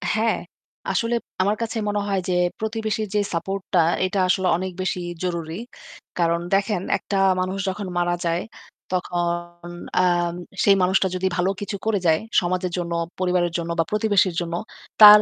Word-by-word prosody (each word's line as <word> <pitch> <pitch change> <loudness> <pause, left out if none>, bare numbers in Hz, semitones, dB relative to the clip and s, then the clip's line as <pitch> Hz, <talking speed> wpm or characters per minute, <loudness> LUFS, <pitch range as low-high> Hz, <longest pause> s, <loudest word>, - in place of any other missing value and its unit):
হ্যাঁ, 220 +1 +2 0.5
আসলে 235 +1 +1 0.3
আমার 200 +3 +2
কাছে 230 0 -2
মনে 205 0 0
হয় 195 -1 +1
যে - - +2 0.3
প্রতিবেশীর 220 -1 -2
যে - - +4
support 190 +4 -2
টা 180 - +5 0.3
এটা 190 +1 -1
আসলে 185 0 +2
অনেক 185 +1 -3
বেশি 185 0 -1 0.2
জরুরি। 170 -3 -2 0.7
কারণ 170 0 +2
দেখেন 195 -1 +2 0.2
একটা 200 - -3 0.2
মানুষ 185 +1 -1
যখন 200 +1 -4
মারা 175 0 +1
যায়, 170 +1 +1 0.5
তখন 175 -1 -2 0.3
আম 175 -1 +2 0.3
সেই 200 - +6
মানুষটা 190 +1 +3
যদি 185 +1 0
ভালো 180 +1 +2
কিছু 205 0 -3
করে 220 -2 +2
যায় 160 -1 +4 0.2
সমাজের 180 0 -1
জন্য, 170 -1 -2 0.3
পরিবারের 180 -2 +1
জন্য 170 0 -4
বা - - +5
প্রতিবেশীর 205 -4 +2
জন্য 170 -1 -4 0.5
তার, 210 0 +12
185 Hz, 160 wpm, -23 LUFS, 175-205 Hz, 0.7 s, তার